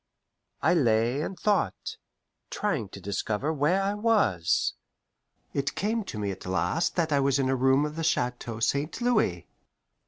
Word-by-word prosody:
I 160 +4 +4
lay 120 -3 +2
and 185 +4 -5
thought, 200 - 0 0.5
trying - - -2
to - - -10
discover 105 +8 -2
where 160 +7 +2
I 200 +1 0
was. 205 - +2 0.8
It 140 +1 -1
came 220 +3 -1
to 110 - -6
me 100 -2 -2
at 95 -1 -8
last 95 - 0
that 165 -3 0
I 140 - +3
was 140 0 +2
in 135 -1 +1
a 135 - +2
room 135 +3 +3
of 150 0 -5
the 165 - -3
Chateau 125 -7 -1
St. 140 - 0
Louis. 215 - +1
140 Hz, 160 wpm, -27 LUFS, 115-175 Hz, 0.8 s, I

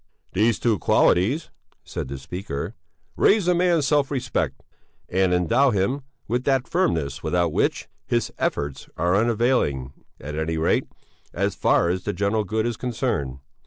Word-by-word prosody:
"These 110 +4 +3
two 110 -5 +1
qualities," 115 - +2 0.3
said - - -5
the 70 +1 -5
speaker, 70 0 -5 0.4
"raise 200 -4 +4
a 180 - +5
man's 175 -4 +2
self 145 -1 +2
respect 125 -3 -2 0.4
and 95 0 +2
endow 115 +11 +3
him 105 +6 0 0.3
with 120 +3 0
that 135 -2 +2
firmness 80 - 0
without 85 0 0
which - - 0 0.2
his 120 -1 0
efforts 70 -2 -2
are 90 +2 +2
unavailing, 110 - +1 0.3
at 75 +3 -7
any 80 +1 -1
rate 80 - +1 0.5
as - - 0
far - - +2
as 90 +1 -1
the 105 - -2
general 105 +2 0
good 110 +3 -1
is 120 -2 -2
concerned. 110 - -2
105 Hz, 150 wpm, -24 LUFS, 80-125 Hz, 0.5 s, a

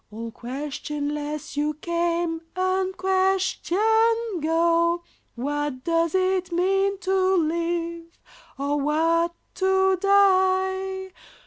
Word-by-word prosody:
All 225 +2 -7
questionless 290 +4 -5
you 295 +1 -1
came, 340 0 -1
unquestioned 375 0 0 0.6
go; 335 +2 +2 0.3
What 285 +1 -3
does 330 +1 +1
it 370 -1 +1
mean 390 +3 +1
to 380 0 +2
live, 335 0 -1 0.5
or 285 +2 -1
what 330 +3 +1 0.2
to 380 0 +2
die? 380 -1 +2
340 Hz, 85 wpm, -24 LUFS, 305-375 Hz, 0.6 s, go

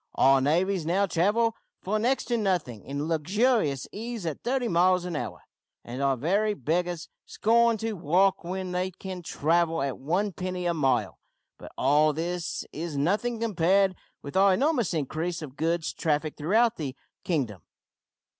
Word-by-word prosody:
Our 135 0 +5
navvies 175 +6 +1
now 180 +5 +2
travel 210 +6 +1 0.3
for 215 +3 0
next 250 +5 +1
to 240 - +2
nothing 175 - -1
in 140 +2 -4
luxurious 165 - +1
ease 225 -2 -5
at 160 -3 -4
thirty 250 0 0
miles 180 0 +3
an 175 -2 -4
hour, - - -5 0.4
and 125 +3 -6
our 135 -1 +2
very 200 - +1
beggars 170 +4 -1 0.2
scorn 235 +1 +3
to 225 +1 -3
walk 185 +2 +2
when 185 +1 -4
they 180 +1 -1
can 185 0 -7
travel 165 0 +1
at 135 -2 -3
one 180 +8 0
penny 180 0 -4
a 175 - +2
mile. 135 -5 0 0.4
But - - -10
all 150 +3 +3
this 170 +2 -3
is 160 -1 -4
nothing 210 +10 0
compared 195 -3 +2 0.3
with 140 - -8
our 190 0 +5
enormous 255 - +1
increase 160 +3 -2
of 135 -3 -9
goods 165 +1 -1
traffic 150 -1 -1
throughout 220 +9 +2
the 140 -4 -4 0.3
kingdom. 125 - -2
175 Hz, 155 wpm, -27 LUFS, 155-200 Hz, 0.4 s, Our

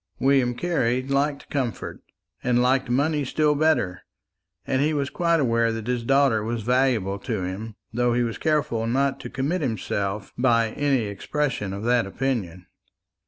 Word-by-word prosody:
William 130 -3 +2
Carley 130 -6 0
liked 140 +1 -1
comfort, 125 -8 -3 0.4
and 125 -1 +2
liked 125 +1 +2
money 145 +4 +1
still 150 +3 +2
better, 145 - +1 0.6
and 130 0 0
he 155 +2 +1
was 140 -2 -1
quite 170 -1 +2
aware 115 -4 +2
that 115 -1 -5
his 125 -1 -1
daughter 135 -4 +3
was 115 0 -3
valuable 120 -5 +1
to 105 -4 -3
him, 100 +4 -5 0.2
though 120 0 +1
he 120 - +2
was 115 -1 -3
careful 150 -8 0
not 135 +3 +1
to - - -7
commit 150 +7 -1
himself 100 -5 -2
by 115 -3 +3
any 140 0 +1
expression 105 +1 -2
of 100 +2 -5
that 120 -2 +2
opinion. 95 -7 -3
125 Hz, 160 wpm, -24 LUFS, 115-140 Hz, 0.6 s, daughter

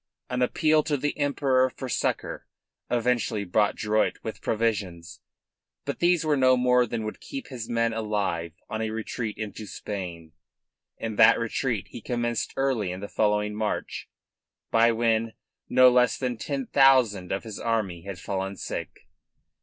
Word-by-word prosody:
An 125 0 -1
appeal 155 +5 +3
to 145 - 0
the 145 +2 -2
Emperor 135 -3 +2
for 130 +1 -7
succour 125 - -2 0.4
eventually 120 -3 0
brought 105 +3 +1
Drouet 110 0 +1
with 110 - -6
provisions, 95 -7 -2 0.7
but - - -4
these 175 -2 +3
were 150 -1 +3
no 130 -2 +4
more 125 0 +3
than 110 0 -3
would 110 - -5
keep 275 -3 -7
his 120 -4 -6
men 115 -1 +1
alive 100 -7 -2
on 110 - -4
a 110 - -1
retreat 110 0 -4
into 110 0 -6
Spain, 90 -7 -6 0.7
and 110 -2 -5
that - - +8
retreat 115 -2 -2
he - - -9
commenced 120 0 -2
early 130 -9 0
in 90 - -5
the 100 - -6
following 105 0 +1
March, 105 0 -3 0.6
by 115 +1 +5
when 115 -1 +1 0.4
no 130 0 +7
less 125 0 +3
than 125 -2 -2
ten 135 +3 -3
thousand 125 -10 +4
of 95 - -2
his 110 -3 -7
army 105 -7 -1
had 95 +1 -7
fallen 95 +1 -3
sick. - - -6
115 Hz, 155 wpm, -26 LUFS, 105-125 Hz, 0.7 s, that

